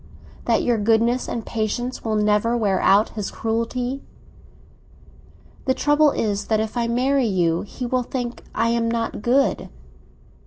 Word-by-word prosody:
—that - - +2
your 240 -2 +1
goodness 230 +3 +2
and 230 - -4
patience 235 +3 -3
will 220 -1 -1
never 210 +3 +2
wear 200 -4 +1
out 200 +3 +4
his 210 -3 -5
cruelty?" 245 +4 -2 1.6
"The 260 - +2
trouble 295 +1 +4
is 205 -6 -1
that 220 -1 +2
if 220 +1 -3
I 235 -1 0
marry 255 +2 +1
you, 175 -4 +1
he 250 +5 -6
will 255 +1 0
think 245 -1 -4
I 230 +1 +2
am 230 0 +1
not 230 -2 -2
good. 260 +5 +1
230 Hz, 150 wpm, -22 LUFS, 215-250 Hz, 1.6 s, out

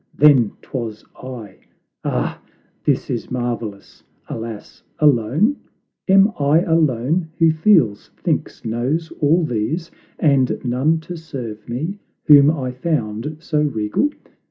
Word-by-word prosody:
then 135 -8 +5
'twas 115 -5 -5
I. 120 -7 -9 0.4
"Ah, - - -2 0.4
this - - +1
is - - -3
marvelous; 120 -5 -5 0.2
alas, 115 -2 -7 0.2
alone? 150 - +3 0.5
Am 195 +2 +6
I 145 +3 +4
alone, 160 -1 +1
who 165 -1 +5
feels, 155 - +3
thinks, - - -2
knows, 130 +9 -1
all 160 +3 +3
these, 155 +8 -2 0.3
And 140 -4 +2
none 135 +6 +1
to 175 +2 -7
serve 120 -10 -8
me 160 +12 -3 0.2
whom 145 -1 +7
I 135 -5 -1
found 125 -1 -2
so 155 -2 0
regal? 120 - 0
140 Hz, 115 wpm, -20 LUFS, 115-160 Hz, 0.5 s, whom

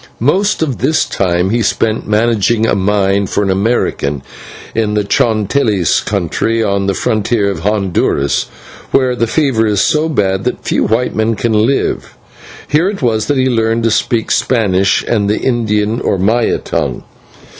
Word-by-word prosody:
Most 185 - +1
of 135 -6 -3
this 155 0 +1
time 90 0 0
he 120 +1 +1
spent 110 +1 -1
managing 110 +1 +1
a - - +1
mine 100 0 +1
for 105 - -1
an 95 - 0
American, 95 - -1 0.5
in 110 -2 -1
the 105 - +1
Chontales 110 - +1
country, 105 +4 -1
on 100 -2 0
the 100 - 0
frontier 110 -2 0
of 95 - -5
Honduras, 95 -7 0 0.4
where 130 -2 +1
the 115 -1 0
fever 125 -5 +1
is 105 -2 +1
so 155 +8 +1
bad 95 -9 0
that - - -3
few - - +1
white 115 +4 0
men 110 +1 0
can 115 +1 -1
live. 110 +6 0 0.5
Here 165 +6 +2
it 200 -8 -6
was 110 -3 0
that 145 - 0
he 130 - +2
learned 115 -2 0
to 115 - +2
speak 115 +1 0
Spanish 100 -6 +1
and 100 -3 0
the 105 - +1
Indian 110 -2 0
or - - 0
Maya 110 +5 +1
tongue. - - -3
110 Hz, 165 wpm, -14 LUFS, 100-120 Hz, 0.5 s, Here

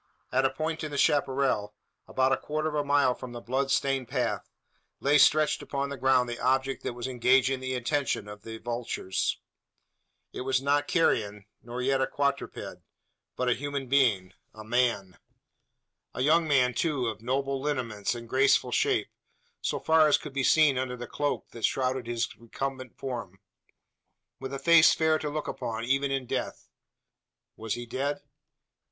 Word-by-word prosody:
At 130 +1 +2
a - - +4
point 160 +2 -3
in 155 - -3
the 145 - -5
chapparal, 135 -8 +1 0.3
about 130 0 +1
a 135 - +3
quarter 155 +1 -3
of 155 - -3
a 150 -1 0
mile 145 -2 +3
from 125 -1 -9
the 120 - -6
blood 135 +3 -1
stained 135 -2 +1
path, 125 0 -2 0.5
lay 145 +2 +4
stretched 155 +1 +4
upon 140 0 -3
the 140 - -4
ground 130 -1 +3
the 120 0 -5
object 130 +1 +1
that - - -4
was 120 +1 -4
engaging 130 +1 +3
the 130 0 -3
attention 125 -3 -1
of 105 0 -10
the 110 +1 -8
vultures. 115 -5 -2 1.0
It - - -5
was 130 0 +1
not 145 +2 +1
carrion, 105 - +1 0.2
nor 120 +1 -5
yet 135 +1 +2
a - - +2
quadruped; 140 -1 -3 0.5
but 125 - -1
a 125 - +4
human 140 +1 -4
being 110 -10 +2 0.2
a 110 - -9
man! 115 -5 0 1.0
A - - -3
young 160 +4 +3
man, 130 -4 +3
too, 140 0 0
of 110 -2 -4
noble 135 +2 -1
lineaments 125 -7 -2
and 115 -1 -8
graceful 135 +3 +3
shape - - +1 0.5
so - - -1
far 160 -1 +4
as 150 - +4
could 150 - -9
be 140 -1 -1
seen 145 -2 +4
under 125 -1 -3
the 120 - -6
cloak 145 +4 -3
that 115 - -10
shrouded 130 -2 0
his 120 0 -1
recumbent 130 +2 -6
form 115 -8 -6 1.0
with 135 - -6
a 140 - -3
face 170 +3 +6
fair 160 -1 +2
to 150 - -3
look 150 0 -4
upon, 115 0 -4
even 135 +3 +1
in 135 -1 -2
death. - - -4 0.9
Was 110 0 -3
he 120 0 -6
dead? 140 +4 -3
130 Hz, 170 wpm, -28 LUFS, 120-140 Hz, 1.0 s, face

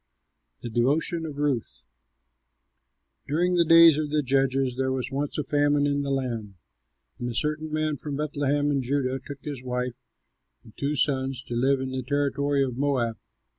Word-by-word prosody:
THE 120 - -5
DEVOTION 155 +8 +1
OF 145 -2 -8
RUTH 145 -5 -2 1.4
During 175 +5 +1
the 175 -1 +4
days 165 -2 +7
of 150 -1 -2
the 150 0 +1
judges, 135 -1 +1
there 130 0 0
was 130 0 -3
once 140 +1 -3
a 150 - 0
famine 145 0 +2
in 145 0 +1
the 140 - -3
land; 120 -7 -3 0.6
and 120 -1 -3
a 120 - -5
certain 155 +3 -1
man 155 -1 -1
from 145 +2 -5
Bethlehem 145 -1 0
in 140 -2 +1
Judah 130 0 -1
took 140 -1 -9
his 145 -4 -5
wife 125 -1 -2 0.7
and 110 - -17
two 145 +2 -1
sons 135 -2 0
to 120 - -6
live 135 +3 +2
in 130 0 -4
the 130 0 -2
territory 140 +1 0
of 125 -3 -3
Moab. 130 -5 0
140 Hz, 170 wpm, -26 LUFS, 130-145 Hz, 1.4 s, days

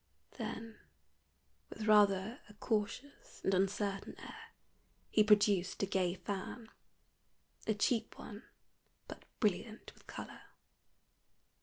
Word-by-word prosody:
Then 225 0 -5 0.9
with 215 - -6
rather 210 0 +5
a 210 - -14
cautious 225 +6 -3
and 195 - +2
uncertain 195 +1 0
air - - -10 0.6
he 215 - +6
produced 205 -3 +4
a - - +4
gay 185 -2 +1
fan 200 +5 -5 1.0
a 220 - +2
cheap 225 +2 +1
one, 210 0 -8 0.7
but - - -9
brilliant 215 +1 -1
with - - -22
color. - - -8
210 Hz, 105 wpm, -35 LUFS, 195-220 Hz, 1.0 s, he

